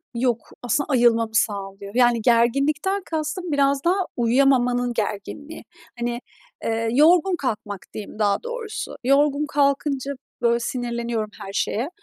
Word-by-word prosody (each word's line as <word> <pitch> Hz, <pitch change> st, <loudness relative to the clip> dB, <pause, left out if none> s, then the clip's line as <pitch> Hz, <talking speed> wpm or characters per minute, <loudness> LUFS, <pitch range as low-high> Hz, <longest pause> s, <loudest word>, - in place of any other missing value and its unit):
Yok 235 Hz, -1 st, -1 dB
aslında 245 Hz, +4 st, 0 dB
ayılmamı 230 Hz, -4 st, +3 dB
sağlıyor? 200 Hz, -1 st, -2 dB
Yani 240 Hz, -2 st, +4 dB
gerginlikten 275 Hz, -, +2 dB
kastım 320 Hz, +2 st, -3 dB
biraz 280 Hz, -1 st, +2 dB
daha 350 Hz, +2 st, +3 dB, 0.2 s
uyuyamamanın 245 Hz, 0 st, +2 dB
gerginliği. 230 Hz, +8 st, -5 dB, 0.4 s
Hani, 240 Hz, 0 st, -2 dB, 0.4 s
ııı, 225 Hz, 0 st, 0 dB
yorgun 345 Hz, +7 st, +5 dB
kalkmak 210 Hz, -, -4 dB
diyeyim 210 Hz, 0 st, -8 dB
daha 205 Hz, -, +1 dB
doğrusu. 480 Hz, -3 st, -5 dB
Yorgun 285 Hz, +2 st, +3 dB
kalkınca 280 Hz, -1 st, 0 dB, 0.3 s
böyle 235 Hz, 0 st, +3 dB
sinirleniyorum 235 Hz, -3 st, -3 dB, 0.2 s
her 195 Hz, -, -8 dB
şeye. 235 Hz, +8 st, -1 dB
245 Hz, 120 wpm, -23 LUFS, 230-290 Hz, 0.4 s, yorgun